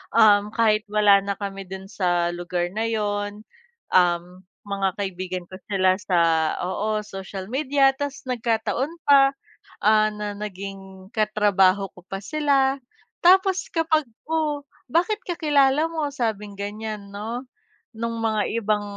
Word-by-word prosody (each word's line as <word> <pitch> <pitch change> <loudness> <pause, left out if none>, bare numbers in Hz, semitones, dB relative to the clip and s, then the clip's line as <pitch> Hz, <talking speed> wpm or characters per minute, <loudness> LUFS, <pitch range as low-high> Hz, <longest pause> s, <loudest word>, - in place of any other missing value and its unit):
um, 210 -2 +6
kahit 215 -1 +2
wala 205 -1 +5
na 200 0 -3
kami 195 -1 -6
dun 190 +1 -8
sa 175 -3 +1
lugar 175 0 -3
na 220 +3 -1
yun, 205 -1 -2 0.5
um, 175 -2 +4 0.4
mga 195 -2 -1
kaibigan 185 -2 -4
ko 185 +2 -11
sila 185 -2 +2
sa 180 -4 +1 0.4
oo, 210 +3 -1
social 195 0 -8
media. 275 0 +3
Tas 285 -1 -4
nagkataon 250 +4 -1
pa, 275 -1 +5 0.4
ah, 215 0 +4
na 210 -1 -5
naging 195 -2 -8
katrabaho 205 -3 +3
ko 180 - -15
pa 195 - -5
sila. 275 0 +2 0.5
Tapos 380 +1 +4
kapag, 320 -3 +1 0.2
"Oh, 305 -2 -1 0.2
bakit 360 - +1
kakilala 300 - +2
mo?" 320 -3 -2
sabing 210 -6 -3
ganyan, 205 0 -6
'no, 230 +5 -5 0.5
nung 230 +1 -3
mga 220 -2 0
ibang 215 -2 +1
210 Hz, 130 wpm, -24 LUFS, 195-270 Hz, 0.5 s, um